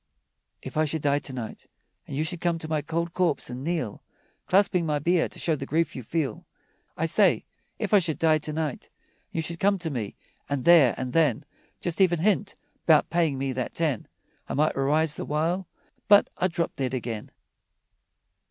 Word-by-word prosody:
If - - -7
I 155 - +3
should 155 0 -2
die 145 0 +2
to 140 - -5
night 120 -4 -7 0.4
And - - -6
you 155 - +1
should 170 +1 -3
come 170 -1 +1
to 160 - -6
my 155 -1 0
cold 170 +3 -3
corpse 170 -8 0
and 125 +2 -6
kneel, 160 -10 -2 0.5
Clasping 190 -2 +3
my 150 -2 0
bier 170 +3 +1
to - - -9
show 160 - +1
the 135 -1 -6
grief 165 +3 0
you 130 - -5
feel, 145 +4 -2 0.5
I - - 0
say, - - +3 0.3
if - - -3
I 205 - +8
should 165 -4 -1
die 160 -1 +3
to 155 +1 -4
night 150 -3 -3 0.4
And - - -40
you 165 - 0
should 170 +1 -3
come 200 0 +3
to 170 -3 -3
me, 110 -7 -4 0.3
and 140 -3 -2
there 160 -8 +7
and 125 -1 -4
then 150 -4 +2 0.4
Just 175 +2 -1
even 175 -2 +4
hint 200 +3 +1 0.3
'bout 155 -3 +5
payin' 165 -5 +1
me 135 0 -2
that 130 -1 -4
ten, 155 -9 -1 0.4
I - - -2
might 155 +2 +2
arise 150 +3 +2
the - - -3
while, 165 +5 -1 0.4
But 205 -1 +6
I'd 185 0 +1
drop 170 0 -1
dead 130 -1 -2
again. 115 -3 -4
155 Hz, 200 wpm, -26 LUFS, 140-170 Hz, 0.5 s, I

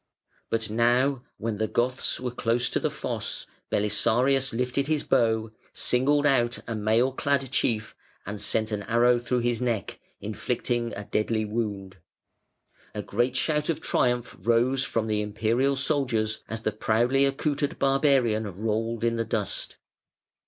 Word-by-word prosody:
But 115 -1 0
now 120 +4 +2 0.2
when 110 -1 -3
the 110 +1 0
Goths 125 +3 0
were 125 -1 -3
close 120 0 0
to - - +1
the - - 0
fosse, - - -3 0.2
Belisarius 125 +6 +2
lifted 125 +4 -1
his 155 -2 0
bow, 110 -1 +1 0.2
singled 145 +4 +2
out 125 -4 +3
a 115 - -2
mail 110 +4 +2
clad 135 -1 0
chief, 110 -2 0 0.3
and 100 +1 -5
sent 110 +1 0
an 105 -1 -2
arrow 120 +1 +4
through 120 +1 -1
his 120 0 0
neck, 115 -5 -2 0.2
inflicting 120 +2 -2
a 105 - -5
deadly 110 +1 0
wound. 105 -4 -4 1.0
A 105 - -3
great 120 +6 0
shout 150 +3 +1
of 165 - 0
triumph 125 -1 0
rose 120 +3 +2
from 115 -4 -1
the 105 -1 0
Imperial 115 +6 +1
soldiers 130 -6 0
as 115 0 -5
the 110 - +1
proudly 120 +6 +2
accoutred 145 +1 0
barbarian 135 -6 +2 0.2
rolled 115 +1 -1
in 115 0 +1
the 115 - +1
dust. 105 -3 -2
120 Hz, 145 wpm, -26 LUFS, 110-130 Hz, 1.0 s, arrow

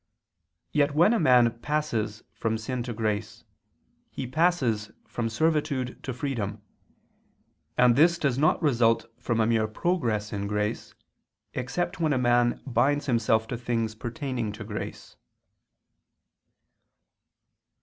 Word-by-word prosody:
Yet 145 -1 +2
when 175 +8 +5
a 230 - +2
man 120 - +4
passes 120 -8 -2
from 110 0 -1
sin 120 +3 -3
to - - -1
grace, 105 -1 -2 0.7
he - - -5
passes 130 -7 +1 0.2
from 115 -1 -2
servitude 145 -1 0
to 135 - -4
freedom; 120 -6 -3 1.2
and 125 -1 +5
this 170 +5 +5
does 140 -7 +1
not 150 +4 +3
result 115 -6 +3
from 115 -1 -1
a 110 - +4
mere 110 -1 +2
progress 110 - -1
in 100 0 -2
grace, 105 0 -2 0.6
except 130 +10 -2
when 160 -3 +2
a - - +1
man 120 -1 +2
binds 145 +2 +1
himself 110 -3 +2
to 120 - -3
things 115 -2 -1
pertaining 120 0 -4
to 105 +1 -7
grace. 105 0 -7
120 Hz, 125 wpm, -27 LUFS, 110-145 Hz, 1.2 s, when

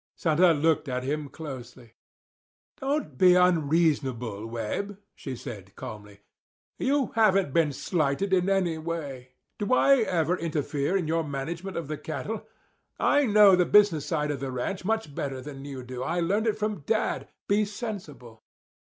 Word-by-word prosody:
Santa 170 +2 +4
looked 160 -1 +1
at 125 0 -2
him 145 +2 -2
closely. 125 -6 -9 0.9
"Don't 270 - -2
be 180 -1 +7
unreasonable, 145 - +1
Webb," 120 - -4 0.2
she 135 -3 -6
said 100 -5 -9
calmly. 105 -1 -9 0.6
"You 275 -1 +1
haven't 195 -9 +3
been 165 -3 +3
slighted 160 +5 -1
in 185 0 +3
any 180 -5 +1
way. 145 -6 -5 0.3
Do 210 +4 +2
I 275 +1 +5
ever 180 - +1
interfere 155 0 -1
in 175 -5 -2
your 165 +1 +1
management 160 +6 -5
of 165 -4 -4
the 155 0 -4
cattle? 215 +7 -5 0.5
I 290 -2 +3
know 205 -2 +7
the 180 - +4
business 200 -8 +4
side 150 -3 0
of 140 - -4
the 135 -1 -4
ranch 130 +11 -3
much 220 -7 -1
better 135 -2 -3
than 135 0 -8
you 135 -3 -7
do. 125 0 -7
I 170 +7 -1
learned 200 +6 +1
it 215 -1 +1
from 210 -3 -2
Dad. 215 +10 -1 0.2
Be 205 +1 +3
sensible." 190 - -7
160 Hz, 155 wpm, -27 LUFS, 135-195 Hz, 0.9 s, be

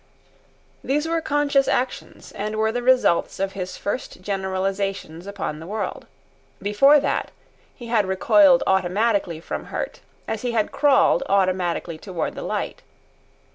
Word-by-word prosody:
These 295 +4 0
were 330 0 0
conscious 290 -2 +2
actions, 255 +1 -3
and 210 +2 -4
were 220 0 +1
the 245 +2 -2
results 250 -8 +2
of 195 0 -1
his 185 -2 -6
first 205 +1 -4
generalisations 190 -2 -3
upon 195 -6 -4
the 165 - -9
world. 210 +2 -4 0.5
Before 240 +9 +5
that 285 - -1 0.5
he 240 - -10
had 225 -4 +1
recoiled 265 +8 +5
automatically 190 -1 +1
from 165 - -5
hurt, - - -5 0.3
as 220 - -3
he 245 -1 -2
had 220 -2 0
crawled 280 -2 +4
automatically 185 -4 0
toward 180 -3 -4
the - - -7
light. - - -3
205 Hz, 135 wpm, -23 LUFS, 190-255 Hz, 0.5 s, Before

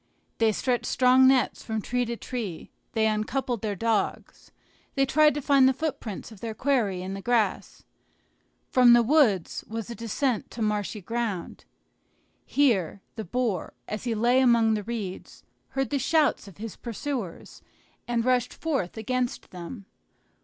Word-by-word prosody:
They 225 -1 +4
stretched 245 +3 -1
strong 255 +1 +5
nets 260 -1 +3
from 220 -1 -2
tree 245 +3 -1
to 235 0 -4
tree; 220 -11 -6 0.2
they 220 -1 +2
uncoupled 220 +2 -1
their 210 -2 -2
dogs, 225 +2 -2 0.4
they 275 -1 +3
tried 300 +2 +4
to 295 - -3
find 275 -2 +5
the - - +2
footprints 250 -9 -4
of 215 - -13
their 225 -2 -4
quarry 220 -10 0
in 190 +1 -5
the 195 - -6
grass. 235 -1 0 0.8
From 250 -2 +6
the 240 0 +6
wood 230 - +4 0.2
was 225 0 -5
a - - -5
descent 230 +1 -1
to 230 - -4
marshy 210 0 -1
ground. 225 -3 -4 0.8
Here 200 - +1
the 220 - -4
boar, 220 -2 -2
as 215 - -4
he 235 -2 0
lay 240 +4 +3
among 235 -3 +4
the 215 - -1
reeds, 205 -4 -6 0.3
heard 270 +1 -2
the 280 - +1
shouts 295 -4 +2
of 195 - -13
his 220 0 -7
pursuers, 235 - -5 0.5
and 235 -1 0
rushed 250 -1 +1
forth 270 - -2
against 245 +3 -2
them. 185 +4 -8
235 Hz, 155 wpm, -26 LUFS, 210-255 Hz, 0.8 s, From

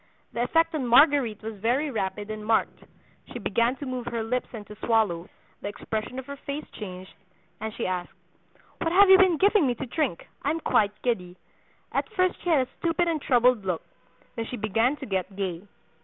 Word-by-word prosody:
The 235 - -1
effect 330 +7 +2
on 280 -5 -1
Marguerite 250 -4 +4
was 220 -1 -6
very 260 +8 +1
rapid 210 -1 -3
and 215 0 -6
marked; 220 +1 0 0.5
she - - -5
began 235 +3 +1
to 285 - -7
move 255 -2 -4
her 230 -1 -2
lips 250 +3 -1
and 215 -4 -8
to 210 - -11
swallow; 205 -7 +1 0.3
the - - -4
expression 220 +4 -4
of 265 - -5
her 280 +1 -7
face 280 +2 -5
changed, 185 -3 -8 0.5
and 220 - -4
she - - -3
asked, 180 -1 -2 0.7
'What 330 - 0
have 385 +2 +7
you 380 - +9
been 370 -4 +5
giving 400 -3 +4
me 245 - +1
to - - -5
drink? 260 - -2
I 285 - -1
am 320 +2 0
quite 210 -8 +1
giddy.' 185 -7 -1 0.5
At - - -1
first 365 -1 +1
she 355 - -3
had 275 -6 +3
a - - -28
stupid 340 +1 +1
and 315 -3 -1
troubled 245 -4 +3
look; 180 -4 -2 0.5
then 230 - -3
she 250 - -5
began 225 +6 +1
to - - -7
get 190 -1 -2
gay. 190 -1 -4
235 Hz, 200 wpm, -26 LUFS, 210-285 Hz, 0.7 s, you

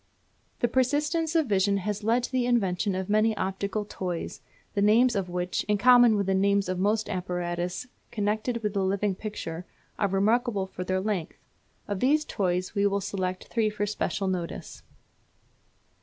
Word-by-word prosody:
The 240 - +4
persistence 295 +6 +1
of 320 -2 +4
vision 200 -2 +2
has 205 +2 -3
led 235 +3 +2
to - - -4
the 255 -2 +1
invention 195 -5 +1
of 190 0 -3
many 215 +1 +2
optical 200 +2 -2
toys, 180 -4 -5 0.3
the 200 - 0
names 225 +4 +4
of 190 -3 -1
which, 180 0 -2
in 210 -1 +1
common 245 0 +6
with 200 -1 0
the 195 - +1
names 200 0 +2
of 185 0 -2
most 210 +3 +1
apparatus 180 -1 -3 0.2
connected 220 +2 -1
with 210 -1 -1
the 200 -2 0
living 195 +1 +1
picture, 180 -4 -6 0.4
are 200 - +3
remarkable 205 +2 +1
for 185 -1 -6
their 185 +1 -1
length. 195 -5 -3 0.5
Of 205 -2 -2
these 300 +6 +3
toys 185 -2 -1
we 200 -1 +2
will 200 0 0
select 185 -2 -3
three 225 -2 +1
for 210 0 -2
special 205 -1 -2
notice. 180 -3 -4
200 Hz, 170 wpm, -27 LUFS, 185-225 Hz, 0.5 s, common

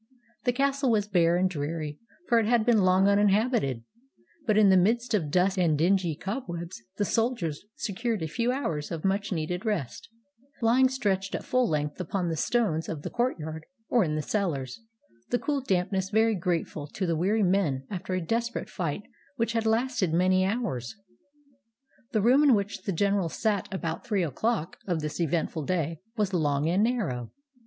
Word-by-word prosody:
The 245 - +4
castle 275 +1 +1
was 210 -3 +2
bare 175 -4 +3
and 185 +1 +3
dreary, 150 -2 -4 0.3
for 235 -2 +4
it 220 - 0
had 235 -1 +2
long 190 -5 +4
been 200 +1 +4
uninhabited, 205 - +2 0.6
but 215 -2 +3
in 210 -2 +6
the 190 - +6
midst 230 +6 +2
of 170 -8 +1
dust 185 +4 +2
and 160 -4 +3
dingy 175 0 +2
cobwebs 175 - -5 0.2
the 205 - +1
soldiers 225 - -1
secured 220 -1 -2
a - - -1
few 235 +10 0
hours 165 - -2
of 165 0 -5
much 200 +2 0
needed 180 +2 -2
rest, 175 - -3 0.5
lying 250 +3 +4
stretched 200 -7 -1
at - - -4
full 255 -2 +1
length 150 +2 -2
upon 180 0 -2
the 165 - -1
stones 165 -3 0
of 155 -3 -5
the - - -5
courtyard 160 -11 -2 0.2
or 240 -4 +4
in 155 -3 -1
the 155 - -2
cellars, 150 - -2 0.5
the 245 - +2
cool 285 +1 -1
damp 185 -7 0
ness 190 -1 -1
very 220 +1 +3
grateful 170 -5 -2
to 190 +6 -3
the 170 -2 0
weary 200 +7 +1
men 175 -9 +1
after 185 -1 -3
a 185 - -1
desperate 230 +4 -2
fight 175 +1 -3 0.3
which 230 -2 -1
had 225 -1 0
lasted 225 -5 +1
many 185 +1 +3
hours. 190 - -2 1.2
The 215 -3 +1
room 255 +5 +5
in 285 -5 +6
which 200 -2 -3
the 195 - 0
general 195 0 +1
sat 205 +1 -1
about 170 -4 -3
three 205 -5 0
o'clock 175 - -2
of 170 -4 0
this 150 +3 -3
eventful 160 -1 -1
day 165 -2 -1 0.2
was 205 -2 0
long 145 -3 +1
and 185 +5 +2
narrow. 180 - -1
190 Hz, 180 wpm, -27 LUFS, 165-225 Hz, 1.2 s, in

